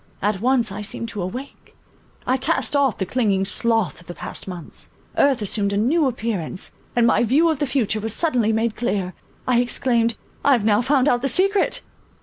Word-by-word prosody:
At 200 -1 -1
once, 245 -3 +2
I 205 +2 -5
seemed 225 +2 -5
to 210 - -5
awake; 250 +10 -7 0.5
I 255 - +2
cast 295 +3 -1
off 275 -4 +2
the 190 - -1
clinging 200 -4 +1
sloth 225 - 0
of 175 - -19
the 175 - -7
past - - -7
months; 180 -4 -8 0.3
earth 270 -6 +3
assumed 200 0 0
a - - 0
new 280 +8 +2
appearance, 215 -8 -3 0.2
and 240 -1 +4
my 235 - +4
view 290 +8 +3
of 305 - -3
the 290 - 0
future 235 -5 0
was 220 +1 -3
suddenly 240 -4 +1
made 225 0 0
clear. 195 -6 -2 0.3
I 245 -1 +4
exclaimed, 235 -2 +1 0.3
"I 280 - +5
have 230 -5 +1
now 210 0 +4
found 265 +1 +2
out 245 -3 +2
the 275 - 0
secret!" 395 - +2
235 Hz, 195 wpm, -22 LUFS, 205-265 Hz, 0.5 s, I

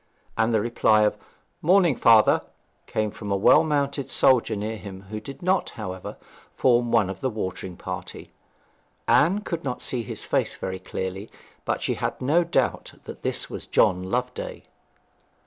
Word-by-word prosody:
And 110 +1 +2
the 110 -2 +2
reply 110 -2 +3
of 105 - +2 0.5
'Morning, 175 -3 +4
father,' 115 -2 +5 0.5
came 110 -1 -1
from 100 0 -7
a 100 - +2
well 95 - +6
mounted 140 -3 -1
soldier 125 -4 +3
near 105 +2 -3
him, 95 -1 -9
who 110 - -3
did 135 +9 -10
not, 185 +1 +1
however, 95 -4 -6 0.4
form 120 -2 +3
one 110 -5 +4
of 95 0 -7
the 130 - 0
watering 95 -4 -5
party. - - -7 0.8
Anne 190 +7 +4
could 170 -5 -4
not 125 -3 -3
see 125 - 0
his 115 - -6
face - - 0
very 95 0 -5
clearly, 95 +4 -5 0.4
but - - -1
she - - 0
had - - -3
no 155 +7 +3
doubt 135 -7 -1
that - - -10
this - - -1
was - - -7
John 90 0 +3
Loveday. 125 +7 -4
115 Hz, 165 wpm, -25 LUFS, 100-140 Hz, 0.8 s, well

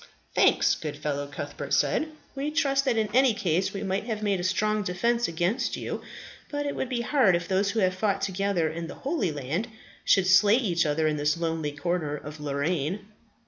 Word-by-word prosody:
"Thanks, - - +4
good 150 -2 -5
fellow," 145 -1 -3
Cuthbert 140 - -3
said. 315 - +1 0.3
"We 280 +2 -2
trust 280 -3 +1
that 250 -4 +2
in 220 -1 +2
any 255 -2 +4
case 180 -1 0
we 195 - -5
might 195 +1 -1
have 220 -3 -3
made 200 -3 +1
a - - -3
strong 210 +3 +1
defence 235 +6 0
against 175 +8 -1
you; - - -4 0.5
but 290 0 -3
it 285 - -2
would 260 - -3
be 245 -2 -1
hard 235 -6 +3
if 170 0 -2
those 195 +1 +1
who 220 +1 0
have 185 -1 +3
fought 195 +1 0
together 195 -3 0
in 165 +1 -4
the - - -8
Holy 265 - -1
Land, 150 - -3 0.4
should 195 -2 +4
slay 200 +3 +6
each 180 -10 +1
other 155 +2 +1
in 155 -1 +1
this 150 +2 +1
lonely 165 -3 -2
corner 155 0 -2
of 150 +1 -9
Lorraine." 150 +7 -2
190 Hz, 200 wpm, -27 LUFS, 160-220 Hz, 0.5 s, slay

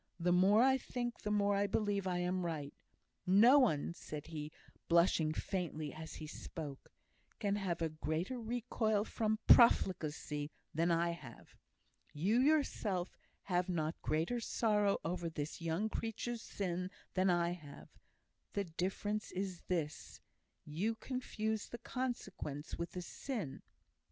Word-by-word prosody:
"The 175 +1 +2
more 195 +6 +6
I 265 0 +4
think, 240 -1 -4
the 210 - -2
more 205 -1 +3
I 200 +1 +2
believe 200 -1 0
I 180 -1 0
am 180 +1 0
right. 155 -4 -3 0.5
No 230 +9 +8
one," 170 - +2
said 150 -3 -7
he, 155 -2 -6 0.4
blushing 170 -2 +4
faintly 155 -4 -3
as 160 0 -8
he 155 - -7
spoke, 150 -2 -7 0.5
"can 205 -2 0
have 175 -4 -1
a 165 - +1
greater 160 - -2
recoil 220 -2 0
from 220 0 0
profligacy 155 -9 +4 0.2
than 165 +3 +2
I 170 0 +2
have. 140 -9 -11 0.6
You 195 +11 +2
yourself 250 - +1 0.3
have 180 -1 0
not 160 -2 -1
greater 165 +10 0
sorrow 210 -3 +2
over 175 0 -1
this 150 +1 -5
young 165 +6 0
creature's 225 +1 -3
sin 180 -3 -3 0.2
than 185 0 +3
I 175 -1 +3
have: 150 -5 -9 0.6
the 200 - 0
difference 195 +5 -2
is 185 -2 -3
this, 160 -5 -3 0.5
you 190 +10 -1
confuse 220 -3 -3
the 240 - -6
consequences 220 - -4
with 170 0 -4
the 180 - -4
sin." 185 - -5
180 Hz, 135 wpm, -36 LUFS, 160-215 Hz, 0.6 s, No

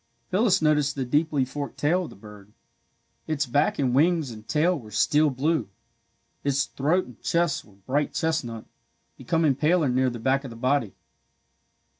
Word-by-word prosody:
Phyllis 195 -3 +3
noticed 150 -2 +2
the 135 -2 -2
deeply 145 +1 +1
forked 140 +2 -6
tail 175 +5 +1
of - - -9
the - - -13
bird. 105 0 -14 0.7
Its 150 -2 0
back 145 +4 +1
and 130 -3 +1
wings 155 -1 +2
and 110 -1 -11
tail 170 +4 +2
were 120 -9 -9
steel 150 +8 +3
blue. 135 - -1 0.7
Its 140 -1 +1
throat 160 +7 0
and 125 - -15
chest 170 -3 0
were 100 - -20
bright 135 +9 -2
chestnut, 125 -9 -2 0.5
becoming 165 -4 +1
paler 155 +2 +2
near 130 +1 +2
the 120 - -6
back 130 +4 +1
of 135 - -7
the 115 - -10
body. 125 -2 0
140 Hz, 165 wpm, -25 LUFS, 125-155 Hz, 0.7 s, Phyllis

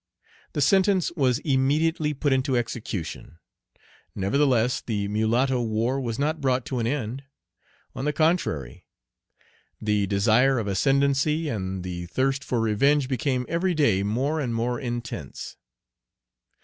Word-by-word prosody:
The 145 - -1
sentence 190 +4 +3
was 135 -8 +1
immediately 150 +2 +1
put 140 0 +1
into 130 -1 +1
execution. 110 -9 -5 0.8
Nevertheless 125 +4 +2
the 105 -3 -2
mulatto 120 +5 +1
war 115 +4 0
was 115 -3 -3
not 155 +2 -1
brought 130 -2 +1
to 130 - -3
an 115 - 0
end. 130 0 -3 0.7
On 135 - -4
the 150 - +2
contrary, 150 - -1 0.9
the 105 -2 0
desire 110 +7 +3
of 115 - -1
ascendency 140 - +1
and 95 -5 -3
the 85 -1 -5
thirst 135 +7 0
for 125 - -1
revenge 130 +6 +2
became 130 -1 -1
every 175 +2 0
day 115 -11 +3
more 130 +10 0
and 125 -6 -2
more 120 +1 -1
intense. 120 -3 -6
130 Hz, 130 wpm, -25 LUFS, 110-145 Hz, 0.9 s, sentence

